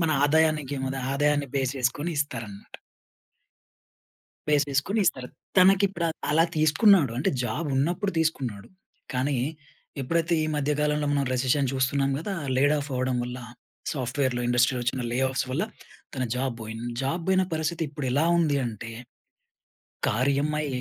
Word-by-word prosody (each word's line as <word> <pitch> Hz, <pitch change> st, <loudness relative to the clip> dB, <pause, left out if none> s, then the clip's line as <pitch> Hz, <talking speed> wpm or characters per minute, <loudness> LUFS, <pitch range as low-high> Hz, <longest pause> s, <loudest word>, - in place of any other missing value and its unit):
మన 165 Hz, -2 st, +2 dB
ఆదాయానికి 150 Hz, -2 st, +2 dB
మన 135 Hz, +1 st, -3 dB, 0.2 s
ఆదాయాన్ని 145 Hz, 0 st, +1 dB
బేస్ 135 Hz, 0 st, 0 dB
చేసుకొని 135 Hz, +6 st, -1 dB
ఇస్తారన్నమాట. 115 Hz, -8 st, -6 dB, 1.8 s
బేస్ 145 Hz, -1 st, +4 dB
చేసుకొని 145 Hz, +11 st, 0 dB
ఇస్తారు. 125 Hz, -1 st, 0 dB, 0.3 s
తనకి 195 Hz, +2 st, +6 dB
ప్ర 170 Hz, -, -1 dB, 0.3 s
అలా 165 Hz, +2 st, +5 dB
తీసుకున్నాడు. 155 Hz, -, +5 dB
అంటే 130 Hz, -, +1 dB
జాబ్ 155 Hz, +6 st, -2 dB
ఉన్నప్పుడు 175 Hz, +8 st, 0 dB
తీసుకున్నాడు. 130 Hz, -11 st, -1 dB, 0.5 s
కానీ 130 Hz, +1 st, 0 dB, 0.6 s
ఎప్పుడైతే 165 Hz, +5 st, 0 dB
ఈ -, -, +1 dB
మధ్య 145 Hz, 0 st, 0 dB
కాలంలో 150 Hz, 0 st, +1 dB
మనం 140 Hz, -1 st, +2 dB
రెసెషన్ 130 Hz, +1 st, +1 dB
చూస్తున్నాం 135 Hz, +1 st, +1 dB
గదా! 195 Hz, +6 st, -4 dB, 0.2 s
లేడ్ 145 Hz, +3 st, +4 dB
ఆఫ్ 145 Hz, +1 st, -6 dB
అవ్వడం 130 Hz, 0 st, 0 dB
వల్ల, 125 Hz, +1 st, -5 dB, 0.6 s
సాఫ్ట్‌వేర్‌లో, 130 Hz, -1 st, -1 dB
ఇండస్ట్రీలో 125 Hz, +1 st, +2 dB
వచ్చిన 125 Hz, +1 st, -1 dB
లే 120 Hz, -, -1 dB
ఆఫ్స్ 130 Hz, 0 st, -1 dB
వల్ల 150 Hz, +8 st, 0 dB, 0.5 s
తన 130 Hz, -, -1 dB
జాబ్ 130 Hz, 0 st, -1 dB
బోయింది. 110 Hz, +2 st, -6 dB
జాబ్ 165 Hz, +6 st, -1 dB
బోయిన 190 Hz, 0 st, +4 dB
పరిస్థితి 160 Hz, +1 st, -1 dB
ఇప్పుడు 145 Hz, -1 st, -5 dB
ఎలా 145 Hz, +5 st, +2 dB
ఉంది 150 Hz, -4 st, +2 dB
అంటే 115 Hz, 0 st, -6 dB, 1.2 s
కార్ 125 Hz, +6 st, +1 dB
ఈఎ‌మ్‌ఐ 150 Hz, +1 st, 0 dB
140 Hz, 140 wpm, -26 LUFS, 130-155 Hz, 1.8 s, తనకి